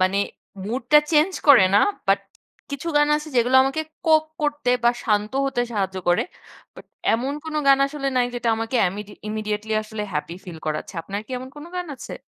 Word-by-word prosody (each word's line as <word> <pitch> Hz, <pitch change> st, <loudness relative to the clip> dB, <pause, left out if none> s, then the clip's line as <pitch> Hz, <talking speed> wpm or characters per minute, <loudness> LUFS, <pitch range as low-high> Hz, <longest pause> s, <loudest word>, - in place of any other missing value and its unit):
মানে 185 Hz, +2 st, +2 dB, 0.5 s
মুড 245 Hz, +4 st, -2 dB
টা 300 Hz, -, +10 dB
চেঞ্জ 315 Hz, +4 st, +4 dB, 0.2 s
করে 245 Hz, -9 st, +9 dB
না। 205 Hz, -, +7 dB, 0.3 s
বাট -, -, +3 dB, 0.5 s
কিছু 280 Hz, +4 st, -4 dB
গান 295 Hz, 0 st, +4 dB
আছে 305 Hz, +1 st, -6 dB
যেগুলো 245 Hz, +2 st, +4 dB
আমাকে 270 Hz, +4 st, -1 dB, 0.3 s
কোপ 315 Hz, -1 st, +5 dB, 0.2 s
করতে 290 Hz, -4 st, 0 dB
বা 240 Hz, -, +7 dB
শান্ত 210 Hz, 0 st, +1 dB
হতে 245 Hz, -3 st, -1 dB
সাহায্য 195 Hz, -2 st, -2 dB
করে। 175 Hz, -, +4 dB, 0.5 s
বাট -, -, -13 dB, 0.3 s
এমন 255 Hz, +5 st, -1 dB
কোন 315 Hz, -1 st, -6 dB
গান 275 Hz, 0 st, +6 dB
আসলে 275 Hz, -1 st, -3 dB
নাই 245 Hz, -1 st, +3 dB
যেটা 240 Hz, -1 st, -2 dB
আমাকে 225 Hz, +3 st, -2 dB
এমইড 205 Hz, +2 st, -7 dB, 0.2 s
ইমিডিয়েটলি 215 Hz, 0 st, -3 dB
আসলে 215 Hz, 0 st, -6 dB
হ্যাপি 160 Hz, +3 st, -3 dB
ফিল 170 Hz, -3 st, -9 dB
করাচ্ছে। 155 Hz, +4 st, -3 dB
আপনার 200 Hz, +4 st, -4 dB
কি -, -, -19 dB
এমন 260 Hz, +1 st, -8 dB
কোন 295 Hz, -, -9 dB
গান 360 Hz, -1 st, -3 dB
আছে? -, -, -8 dB
240 Hz, 190 wpm, -23 LUFS, 210-285 Hz, 0.5 s, টা